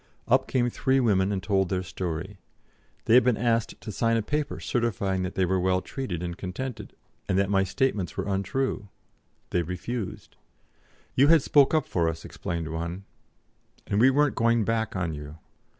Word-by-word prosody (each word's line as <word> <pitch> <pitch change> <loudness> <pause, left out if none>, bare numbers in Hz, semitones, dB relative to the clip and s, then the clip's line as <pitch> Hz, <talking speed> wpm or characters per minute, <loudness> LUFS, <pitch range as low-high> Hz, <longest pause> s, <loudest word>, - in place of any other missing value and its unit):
Up 130 +2 +3
came 125 -2 +1
three 135 +2 +1
women 100 -5 +2
and 95 -2 -2
told 95 -2 +1
their 95 -1 -1
story: 90 +2 -5 0.7
they - - +3
had 125 - +8
been 125 -3 +2
asked 115 -1 0
to 110 - -6
sign 115 +2 +1
a 115 - 0
paper 150 +5 -2
certifying 100 -6 -1
that 90 0 -4
they 95 - +2
were 95 +1 +1
well 90 0 +2
treated 90 -6 -5
and 85 -1 -4
contented, 105 +8 -6 0.3
and 95 - +2
that 100 0 +1
my 95 -1 +3
statements 100 - -1
were - - -2
untrue; 100 +3 -1 0.6
they 90 - +2
refused. 90 +6 -5 0.8
"You 135 +3 +5
had 160 -3 +6
spoke 145 +1 +4
up 155 - +2
for 85 -2 0
us," 80 0 -6
explained 85 -2 -4
one, 85 +3 -4 0.8
"and 100 - 0
we 130 - +7
weren't 145 0 +3
going 115 -1 +2
back 110 -2 -1
on 90 -4 -1
you." 75 +1 -8
100 Hz, 180 wpm, -26 LUFS, 90-120 Hz, 0.8 s, had